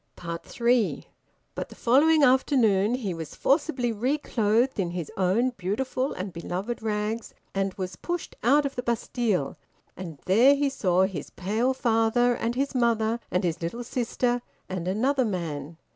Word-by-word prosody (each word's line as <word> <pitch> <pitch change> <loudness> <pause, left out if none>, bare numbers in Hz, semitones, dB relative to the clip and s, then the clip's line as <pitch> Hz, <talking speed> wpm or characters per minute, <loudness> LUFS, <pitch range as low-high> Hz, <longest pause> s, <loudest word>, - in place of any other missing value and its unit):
THREE. 225 +7 -1 0.5
But - - -5
the - - -12
following 295 +6 +4
afternoon 245 -5 +3
he 215 -8 -3
was 160 -2 -7
forcibly 275 -4 +1
reclothed 235 -1 +1
in 180 -3 0
his 165 -4 -5
own 200 +7 +2
beautiful 250 +6 -2
and 185 0 -5
beloved 185 +8 -4
rags, 215 +1 -2 0.2
and 195 -1 -1
was 185 -3 -5
pushed 350 -1 -4
out 285 +5 +4
of 275 - -3
the 245 - -2
Bastille, 230 - -1 0.4
and 170 -5 -7
there 240 +9 +6
he 285 0 +1
saw 185 -8 +2
his 185 -7 -3
pale 220 +8 -1
father 240 0 +2
and 235 0 -2
his 275 +2 -1
mother, 230 -2 +1
and 180 - 0
his 170 -1 -1
little 200 +9 -3
sister, 245 0 -1 0.3
and 180 -2 -4
another 260 +8 +1
man. 165 - -4
225 Hz, 150 wpm, -26 LUFS, 185-250 Hz, 0.5 s, there